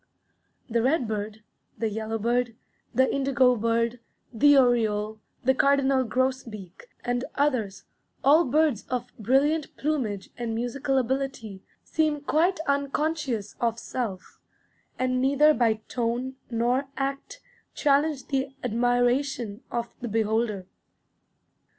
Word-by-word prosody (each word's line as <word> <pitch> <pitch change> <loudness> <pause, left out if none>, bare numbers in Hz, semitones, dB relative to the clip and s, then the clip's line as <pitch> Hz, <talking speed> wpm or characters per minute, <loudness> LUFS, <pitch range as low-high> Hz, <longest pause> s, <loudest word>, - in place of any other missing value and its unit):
The 235 -1 +1
redbird, 220 -6 -1 0.3
the 225 - 0
yellowbird, 225 +2 -1 0.4
the 260 +1 +3
indigo 265 -2 +3
bird, 230 +1 0 0.3
the 285 +5 +6
oriole, 220 -4 +2 0.2
the 265 +1 +4
cardinal 275 -1 +3
grosbeak, 230 -6 -3 0.2
and 245 0 0
others, 250 -9 0 0.4
all 305 +5 +6
birds 290 -3 +2
of 250 -1 -3
brilliant 280 +7 +1
plumage 250 -10 -2
and 230 -2 -2
musical 265 +4 -1
ability, 255 -6 -2 0.2
seem 310 -2 0
quite 330 +6 +1
unconscious 280 -6 -1
of 230 -1 +1
self, 225 -6 -5 0.6
and 255 0 0
neither 285 +3 +5
by 230 -5 +2
tone 245 +2 -2
nor 245 +3 0
act 275 - -3 0.4
challenge 285 -1 +2
the 270 -1 -1
admiration 245 -1 0
of 235 0 -3
the 240 - -3
beholder. 220 -2 0
250 Hz, 105 wpm, -26 LUFS, 225-275 Hz, 0.6 s, the